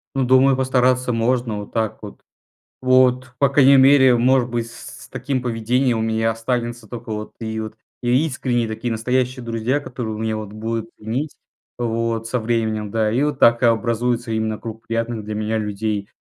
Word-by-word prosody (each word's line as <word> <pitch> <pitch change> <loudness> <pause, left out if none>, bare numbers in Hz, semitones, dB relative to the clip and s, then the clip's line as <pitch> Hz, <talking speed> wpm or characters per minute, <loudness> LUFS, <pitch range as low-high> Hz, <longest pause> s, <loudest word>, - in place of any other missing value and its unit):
Ну, 135 - +1
думаю, 130 +1 +5
постараться 130 -1 +2
можно 115 -2 0
вот 100 - -9
так 110 -2 -1
вот. - - -10 0.6
Вот, 130 0 +3
по 140 0 +4
крайней 140 0 +6
мере, 130 -1 +6
может 125 +1 +3
быть, 120 -1 -2
с - - -11
с - - -39
таким 130 0 -2
поведением 120 +1 0
у - - 0
меня 110 0 +1
останутся 120 0 -3
только 115 0 -8
вот 105 0 -5
и 110 -1 -3
вот 110 0 -7 0.3
искренние, 120 -3 0
настоящие 125 +2 -1
друзья, 115 +4 -1
которые 115 -5 -5
меня 110 -1 -1
вот 105 -2 -7
будут 115 +1 -4
ценить 125 +8 -3 0.5
вот 115 -1 -1
со 125 +2 -1
временем, 110 -2 -1
да. 110 0 +1
И 125 +5 +1
вот 150 0 -1
так 115 +1 +5
образуется 115 +1 +1
именно 110 -1 -1
круг 115 -1 -9
приятных 115 -1 -2
для 105 0 -5
меня 110 +1 -1
людей. 105 -1 -3
115 Hz, 170 wpm, -21 LUFS, 110-125 Hz, 0.6 s, крайней